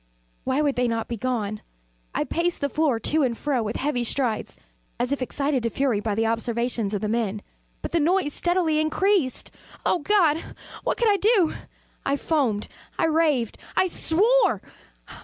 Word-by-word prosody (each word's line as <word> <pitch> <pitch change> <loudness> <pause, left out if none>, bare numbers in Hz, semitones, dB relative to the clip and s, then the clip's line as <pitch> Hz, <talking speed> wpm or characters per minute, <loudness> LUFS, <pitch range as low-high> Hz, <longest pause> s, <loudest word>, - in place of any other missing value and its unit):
Why 265 +3 +1
would 285 -3 0
they 250 0 +2
not 230 -1 -1
be 235 - -3
gone? 215 -3 -2 0.5
I - - +1
paced 345 +1 -1
the 285 - 0
floor 290 -5 +1
to 310 +7 +1
and 245 -4 +1
fro 280 -5 0
with 215 0 -3
heavy 270 -3 0
strides, 240 -2 -2 0.4
as 245 +2 0
if 280 - -1
excited 275 +1 0
to 230 - 0
fury 255 -3 0
by 210 -1 -2
the 225 +1 +1
observations 230 -1 -1
of 200 - -2
the 215 - -1
men 215 -2 -1 0.4
but - - -4
the 340 - +2
noise 330 -1 +2
steadily 345 -3 +1
increased. 310 -2 +1 0.3
Oh 360 - +2
God! 330 -3 +3 0.4
what - - 0
could 475 - +2
I 405 - +3
do? 395 -4 +3 0.5
I 275 - +1
foamed 260 -11 0 0.3
I - - +2
raved 310 -8 +1 0.2
I - - +5
swore! 420 +8 +2
275 Hz, 175 wpm, -25 LUFS, 230-325 Hz, 0.5 s, I